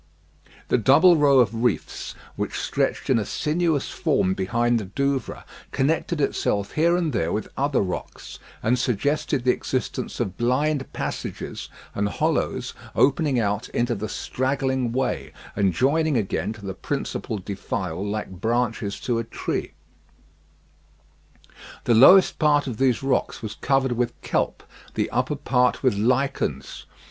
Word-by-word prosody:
The -, -, +3 dB
double 160 Hz, -, +6 dB
row 145 Hz, -3 st, +5 dB
of 115 Hz, -2 st, +2 dB
reefs, 120 Hz, -4 st, -1 dB, 0.2 s
which -, -, -3 dB
stretched -, -, -1 dB
in -, -, +4 dB
a -, -, -1 dB
sinuous 155 Hz, -, 0 dB
form 95 Hz, -, +1 dB
behind 115 Hz, +5 st, +1 dB
the 105 Hz, -, -5 dB
Douvres, 135 Hz, +5 st, -2 dB, 0.3 s
connected 155 Hz, +4 st, 0 dB
itself 100 Hz, -7 st, 0 dB
here 170 Hz, +3 st, +3 dB
and 165 Hz, -5 st, -1 dB
there 85 Hz, -7 st, 0 dB
with 110 Hz, -, -3 dB
other 140 Hz, 0 st, +1 dB
rocks, 95 Hz, -2 st, -5 dB, 0.2 s
and 125 Hz, +3 st, +2 dB
suggested 140 Hz, +4 st, 0 dB
the 125 Hz, -, +4 dB
existence 130 Hz, 0 st, -3 dB
of 95 Hz, -6 st, -2 dB
blind 135 Hz, +4 st, 0 dB
passages -, -, -5 dB, 0.2 s
and 100 Hz, 0 st, 0 dB
hollows -, -, -1 dB, 0.2 s
opening 140 Hz, -1 st, +3 dB
out 105 Hz, +1 st, -1 dB
into 120 Hz, +1 st, 0 dB
the 110 Hz, 0 st, -4 dB
straggling 130 Hz, -1 st, -1 dB
way, 130 Hz, +1 st, -2 dB, 0.2 s
and 100 Hz, -2 st, +2 dB
joining 145 Hz, -, +2 dB
again 105 Hz, 0 st, -1 dB
to 105 Hz, -2 st, -12 dB
the 95 Hz, -, -3 dB
principal 110 Hz, -, -3 dB
defile 95 Hz, -2 st, -4 dB
like 105 Hz, -1 st, -3 dB
branches 115 Hz, -3 st, -1 dB
to 120 Hz, -2 st, 0 dB
a -, -, -1 dB
trunk. 115 Hz, -, -4 dB, 2.1 s
The 120 Hz, -, +3 dB
lower 160 Hz, -, +9 dB, 0.2 s
part 150 Hz, -2 st, +3 dB
of 125 Hz, -5 st, -4 dB
these 130 Hz, -1 st, +2 dB
rocks 135 Hz, -2 st, -1 dB
was 110 Hz, -, -4 dB
covered 135 Hz, -1 st, +1 dB
with 120 Hz, 0 st, -1 dB
kelp, -, -, -1 dB, 0.3 s
the -, -, -1 dB
upper 130 Hz, +5 st, 0 dB
part 125 Hz, -3 st, +1 dB
with 130 Hz, -, +4 dB
lichens. 120 Hz, -, -1 dB
125 Hz, 140 wpm, -24 LUFS, 110-140 Hz, 2.1 s, lower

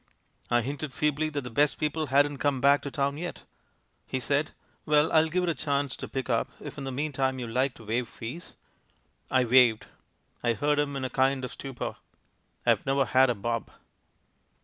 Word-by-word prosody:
"I 120 Hz, 0 st, +3 dB
hinted 140 Hz, +3 st, -5 dB
feebly 150 Hz, +1 st, +1 dB
that 145 Hz, -2 st, -3 dB
the 125 Hz, -2 st, -8 dB
best 145 Hz, +5 st, +2 dB
people 155 Hz, 0 st, -1 dB
hadn't 140 Hz, +1 st, +3 dB
come 145 Hz, -2 st, +1 dB
back 140 Hz, +2 st, +5 dB
to 140 Hz, -, -5 dB
town 140 Hz, +1 st, -1 dB
yet. 175 Hz, 0 st, -6 dB, 0.6 s
"He 130 Hz, -, -2 dB
said, 145 Hz, +3 st, 0 dB, 0.3 s
'Well, 150 Hz, 0 st, +3 dB
I'll 160 Hz, 0 st, +5 dB
give 180 Hz, +3 st, 0 dB
it 175 Hz, -, +1 dB
a -, -, +2 dB
chance 140 Hz, -3 st, -1 dB
to -, -, -6 dB
pick 135 Hz, -1 st, -4 dB
up 115 Hz, 0 st, +1 dB
if -, -, -8 dB
in 135 Hz, -, -5 dB
the 135 Hz, -, -3 dB
meantime 135 Hz, -1 st, -1 dB
you 125 Hz, -2 st, -4 dB
like 125 Hz, +3 st, 0 dB
to 110 Hz, -, -14 dB
waive 115 Hz, +3 st, -1 dB
fees.' 125 Hz, +11 st, -8 dB, 0.7 s
"I 130 Hz, -1 st, +3 dB
waived! 120 Hz, -2 st, +5 dB, 0.6 s
I 120 Hz, -1 st, +2 dB
heard 145 Hz, +6 st, +1 dB
him 145 Hz, -1 st, 0 dB
in 135 Hz, -1 st, -2 dB
a 130 Hz, -, -4 dB
kind 130 Hz, 0 st, +2 dB
of -, -, -7 dB
stupor.... 135 Hz, -3 st, -6 dB, 0.7 s
I've -, -, +3 dB
never 135 Hz, 0 st, +2 dB
had 130 Hz, 0 st, +4 dB
a 120 Hz, -, +1 dB
bob 115 Hz, +3 st, -3 dB
135 Hz, 195 wpm, -28 LUFS, 125-145 Hz, 0.7 s, back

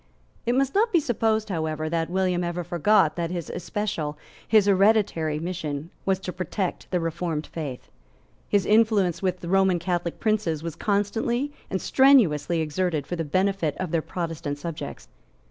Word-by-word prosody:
It 240 Hz, -, +2 dB
must 270 Hz, 0 st, +1 dB
not 450 Hz, +3 st, +3 dB
be 345 Hz, -, +5 dB
supposed 220 Hz, -6 st, 0 dB
however 155 Hz, -3 st, -2 dB
that 165 Hz, 0 st, -1 dB
William 180 Hz, -1 st, +1 dB
ever 175 Hz, 0 st, -2 dB
forgot 175 Hz, 0 st, +3 dB
that 170 Hz, -1 st, -1 dB
his 175 Hz, -2 st, -4 dB
especial, 175 Hz, -6 st, -3 dB, 0.3 s
his 215 Hz, -3 st, +5 dB
hereditary, 195 Hz, -6 st, +3 dB
mission 160 Hz, -2 st, -4 dB, 0.2 s
was 190 Hz, -1 st, +3 dB
to 180 Hz, -2 st, -5 dB
protect 185 Hz, +1 st, -3 dB
the 180 Hz, -, +1 dB
Reformed 165 Hz, -2 st, -2 dB
Faith. 145 Hz, -6 st, -7 dB, 0.6 s
His 200 Hz, -3 st, +2 dB
influence 210 Hz, -5 st, +3 dB
with 185 Hz, -2 st, -2 dB
Roman 190 Hz, 0 st, +3 dB
Catholic 175 Hz, 0 st, -2 dB
princes 210 Hz, -8 st, 0 dB
was 165 Hz, -2 st, -4 dB
constantly 225 Hz, +6 st, 0 dB, 0.2 s
and 190 Hz, -, -1 dB
strenuously 185 Hz, -, +4 dB
exerted 155 Hz, -1 st, -1 dB
for 175 Hz, -, -4 dB
the 165 Hz, -, -2 dB
benefit 185 Hz, 0 st, 0 dB
of 185 Hz, -4 st, -3 dB
their 165 Hz, -, +1 dB
Protestant 165 Hz, -4 st, -4 dB
subjects. 150 Hz, -, -6 dB
180 Hz, 155 wpm, -25 LUFS, 165-205 Hz, 0.6 s, be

